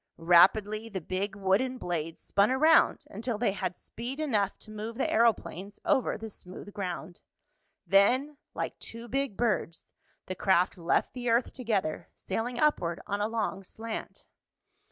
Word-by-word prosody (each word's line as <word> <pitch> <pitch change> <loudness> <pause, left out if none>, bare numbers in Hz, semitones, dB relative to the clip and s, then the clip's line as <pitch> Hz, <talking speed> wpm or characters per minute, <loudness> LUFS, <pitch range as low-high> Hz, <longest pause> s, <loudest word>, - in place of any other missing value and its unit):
Rapidly 205 +6 +4
the 195 -3 -4
big 190 +4 -3
wooden 210 +6 +1
blades 165 -6 -4
spun 200 +1 +3
around 310 +5 +4
until 225 +2 -3
they 220 -2 +1
had 185 -2 -3
speed 245 +5 -7
enough 215 -10 0
to 215 - -12
move 215 +2 -6
the - - +1
aeroplanes 210 -3 +1
over 270 -4 +2
the 225 - -7
smooth 200 0 -10
ground. 180 -4 -5 0.6
Then, 255 +9 +3 0.2
like - - -4
two 230 +1 -9
big 270 -3 -2
birds, 200 -8 -1 0.3
the 185 - -4
craft 185 -1 +2
left 170 -2 0
the 245 -1 -3
earth 235 +2 +2
together, 200 - -2
sailing 230 +5 -3
upward 175 - +2
on 200 +1 -2
a 210 - +1
long 215 -3 -2
slant. 225 +4 -7
210 Hz, 150 wpm, -29 LUFS, 190-235 Hz, 0.6 s, Rapidly